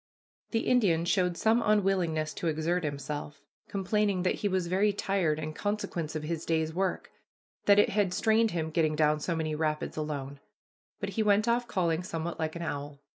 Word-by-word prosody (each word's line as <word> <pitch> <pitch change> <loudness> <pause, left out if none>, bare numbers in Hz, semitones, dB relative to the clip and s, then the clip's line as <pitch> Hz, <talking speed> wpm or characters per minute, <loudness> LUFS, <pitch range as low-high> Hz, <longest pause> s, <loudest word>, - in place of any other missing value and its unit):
The 225 - 0
Indian 190 -11 +2
showed 180 -1 +1
some 225 +2 +3
unwillingness 185 -7 +1
to 170 - -3
exert 165 +3 0
himself, 145 0 -4 0.3
complaining 200 -1 0
that 185 - +2
he 205 - +1
was 185 -2 0
very 190 +4 +2
tired 195 -6 0
in 155 0 -4
consequence 175 -5 -3
of 155 - -3
his 165 +1 -3
day's 160 -1 0
work, 190 +1 -2 0.5
that 200 0 +6
it 205 - +5
had 200 -2 +1
strained 220 +4 +3
him 160 -4 -2
getting 155 -1 +1
down 150 0 +3
so 170 +2 -2
many 155 -1 -2
rapids 155 0 -2
alone; 140 -2 -4 0.6
but - - -3
he 225 - -1
went 210 +1 +3
off 240 +1 +1
calling 170 -6 0
somewhat 170 -2 -4
like 160 0 -2
an 170 - -4
owl. 145 -2 -5
170 Hz, 180 wpm, -29 LUFS, 155-200 Hz, 0.6 s, that